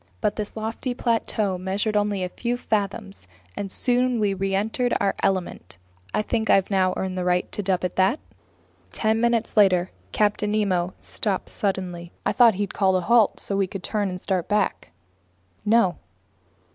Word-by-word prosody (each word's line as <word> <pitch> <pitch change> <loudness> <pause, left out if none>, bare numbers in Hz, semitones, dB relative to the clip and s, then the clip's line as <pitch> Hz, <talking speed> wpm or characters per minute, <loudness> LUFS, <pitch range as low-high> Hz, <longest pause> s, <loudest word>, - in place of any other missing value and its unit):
But 210 -1 0
this 210 +1 -4
lofty 225 +3 -3
plateau 220 -6 0
measured 200 +3 -1
only 205 -2 +1
a 180 - -2
few 240 +5 -2
fathoms, 200 - -2 0.3
and 195 -1 -4
soon 250 +1 +2
we 205 -2 +2
reentered 195 +6 0
Our 200 -1 +1
Element. 175 - -1 0.3
I 215 - 0
think 220 0 -1
I've 195 +1 +4
now 185 -1 +2
earned 185 -1 -2
the - - -1
right 180 0 0
to - - -2
dub 185 -2 0
it 180 - -3
that. 190 +10 +3 0.7
Ten 220 0 +1
minutes 235 -1 +1
later, 185 -4 +4 0.2
Captain 210 0 +1
Nemo 185 -4 0
stopped 200 -4 -2
suddenly. 180 -4 -3
I - - +2
thought 235 -4 +5
he'd 200 0 -3
called 190 -2 +2
a 185 - +2
halt 230 +3 +3
so - - -3
that 195 - +1
we 195 - +2
could 185 0 -7
turn 205 -3 -1
and 180 0 -5
start 185 -2 -1
back. 210 - 0 0.8
No. 210 -4 +3
200 Hz, 170 wpm, -24 LUFS, 185-220 Hz, 0.8 s, thought